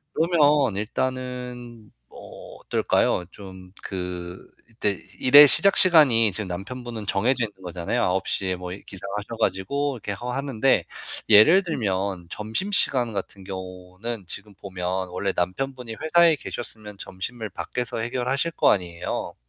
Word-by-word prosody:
그러면 150 - +3
일단은 125 -1 -5 0.2
뭐 - - -12
어떨까요? 90 - 0
좀 95 -2 -12
그 90 -1 -6 0.2
그때 105 -4 -1 0.2
일의 145 +3 +9
시작 195 +7 +5
시간이 135 - +6
지금 100 +1 -3
남편분은 110 +4 -6
정해져 120 +5 +1
있는 100 -3 -13
거잖아요. 90 -1 -3
9:00 95 +1 -1
에 95 - 0
뭐 90 0 -7
이렇게 95 - -9
기상하셔 100 +4 -7
가지고 115 +9 -1
이렇게 100 -2 -6
하 120 +5 -5
하는데 135 -2 +1 0.4
예를 110 - +7
들면 100 - -2
점심시간 120 - 0
같은 100 0 -6
경우는 95 +3 -7
지금 100 +2 -7
보면 95 -1 -4
원래 95 +2 -2
남편분이 120 +6 -3
회사에 165 +1 +4
계셨으면 110 -5 -6
점심을 110 +4 -6
밖에서 125 +4 -4
해결하실 130 +7 -1
거 - - +4
아니에요. 90 -3 -3
110 Hz, 310 characters per minute, -24 LUFS, 95-125 Hz, 0.4 s, 일의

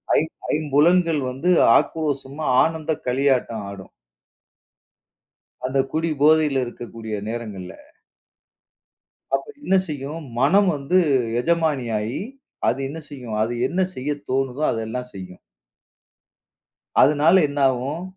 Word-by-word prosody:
I'm 160 +1 +1 0.2
ஐம்புலன்கள் 155 +2 +3
வந்து 135 +8 -2 0.3
ஆக்ரோஷமா 145 -1 -2 0.2
ஆனந்தக் 160 -1 -2
களியாட்டம் 125 -4 +1
ஆடும். 100 -1 -10 1.8
அந்தக் 135 +1 0
குடிபோதையில 155 -3 +2
இருக்கக்கூடிய 115 -2 -7
நேரங்கள்ல. 105 -6 -6 1.6
அப்ப 135 - -4 0.2
என்ன 190 - +2
செய்யும்? 150 +2 -5 0.2
மனம் 190 +10 +4
வந்து 145 +6 0 0.4
எஜமானி 160 -4 +1
ஆயி 110 +5 -3 0.5
அது 125 - -1
என்ன 160 +3 -6
செய்யும். 125 -6 -7
அது 115 - -2 0.2
என்ன 180 - -2 0.2
செய்யத் 145 +2 -4
தோணுதோ 135 +1 -1
அதெல்லாம் 115 +2 -4
செய்யும். 90 -2 -10 1.6
அதனால 150 +6 +5
என்னாவும் 140 +2 0
140 Hz, 95 wpm, -22 LUFS, 125-155 Hz, 1.8 s, அதனால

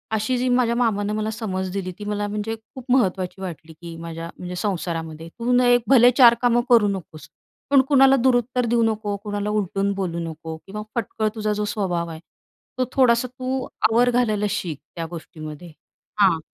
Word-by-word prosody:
अशी 220 +4 0
जी 255 +1 0
माझ्या 245 -1 +2
मामानं 210 -4 0
मला 215 0 -1
समज 190 -4 -3
दिली 190 -1 -3
ती 205 - -6
मला 205 0 -2
म्हणजे 210 +2 -3
खूप 230 +3 -13
महत्त्वाची 190 -6 +1
वाटली 165 -3 -7
की 170 +1 -10
माझ्या 165 0 -6
म्हणजे 180 0 -6
संसारामध्ये, 165 -4 -3
"तू 235 +7 -3
न 250 0 +5
हे 245 -1 +5
भले 245 -2 +7
4 240 -3 +9
कामं 240 -1 +3
करू 230 -4 +6
नकोस, 180 -6 -6 0.4
पण 280 -1 +6
कुणाला 270 -1 +6
दुरुत्तर 250 -1 +1
देऊ 235 0 +2
नको, 215 -2 -1
कुणाला 205 -1 -3
उलटून 200 -1 0
बोलू 180 -4 -3
नको 160 0 -7
किंवा 195 +6 -8
फटकळ 220 -1 -1
तुझा 215 -1 -1
जो 210 0 -2
स्वभाव 185 -5 -2
आहे, 160 -1 -8 0.6
तो 255 - +1
थोडासा 255 -1 +3
तू 255 +1 -3 0.3
आवर 245 +2 +4
घालायला 215 -4 +1
शिक 165 -6 -3 0.2
त्या 165 -1 -3
गोष्टीमध्ये." 160 -1 -9 0.5
हां. 190 -5 +4
210 Hz, 180 wpm, -23 LUFS, 180-240 Hz, 0.6 s, 4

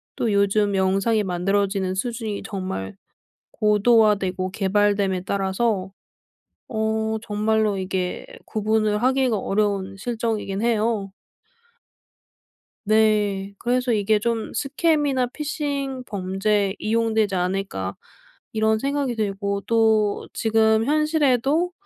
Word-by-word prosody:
또 230 - 0
요즘 200 0 +2
영상이 195 +3 +2
만들어지는 190 +1 0
수준이 220 0 -3
정말 185 - -5 0.6
고도화되고 210 -3 +2
개발됨에 200 -1 +1
따라서 195 0 0 0.8
어 220 0 -1
정말로 215 -1 0
이게 185 -1 -3 0.2
구분을 215 0 0
하기가 260 -3 +2
어려운 195 -1 -1
실정이긴 220 -3 -2
해요. 220 -3 0 1.7
네. 210 -2 +2
그래서 250 0 0
이게 210 0 +2
좀 225 0 -2
'스캠이나 280 -1 +1
피싱 280 -2 -3
범죄에 195 0 -1
이용되지 220 -2 +1
않을까?' 180 - -2 0.6
이런 220 0 +2
생각이 275 -1 -1
들고 200 -2 -2
또 220 -2 +2
지금 220 0 +2
현실에도 305 +1 +2
215 Hz, 235 characters per minute, -23 LUFS, 195-230 Hz, 1.7 s, 요즘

